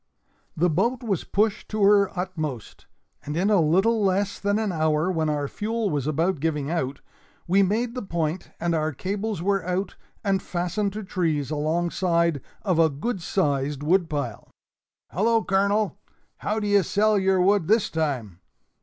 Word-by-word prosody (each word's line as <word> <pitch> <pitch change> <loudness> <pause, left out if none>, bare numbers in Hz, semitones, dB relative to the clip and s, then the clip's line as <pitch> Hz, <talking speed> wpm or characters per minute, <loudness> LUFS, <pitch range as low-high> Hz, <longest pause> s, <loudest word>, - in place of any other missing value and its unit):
The 175 +3 +3
boat 230 +10 0
was 200 -7 -1
pushed 210 +1 0
to 215 -1 -1
her 200 -1 +5
utmost, 155 - -5 0.4
and 150 +2 -4
in 195 +4 +2
a 200 -4 +5
little 195 +8 +3
less 195 +1 0
than 205 +1 +1
an 215 -2 0
hour, 155 +1 +1
when 160 -3 0
our 145 -1 -1
fuel 220 +3 -2
was 145 -2 -1
about 165 +3 0
giving 150 -1 -1
out, 140 -5 -2 0.5
we 190 +3 +4
made 225 +5 0
the 250 - -4
point, 170 -2 -3
and 170 0 0
our 155 -1 0
cables 195 - -3
were 195 -1 +1
out 180 +2 -2 0.3
and 195 -2 +1
fastened 180 +3 -2
to 215 +1 -5
trees 160 -7 -1
alongside 170 0 0 0.2
of 185 -5 +1
a 160 -1 +5
good 180 - -3
sized 145 -5 -1
woodpile. 150 - 0 0.6
"Hallo, 225 +5 +2
Colonel! 200 +1 +1 0.4
How 215 +1 -1
d'ye 205 -1 +3
sell 210 +3 +2
your 190 -1 +2
wood 190 -2 +3
this 220 0 +2
time?" 130 - -2
180 Hz, 160 wpm, -25 LUFS, 155-205 Hz, 0.6 s, her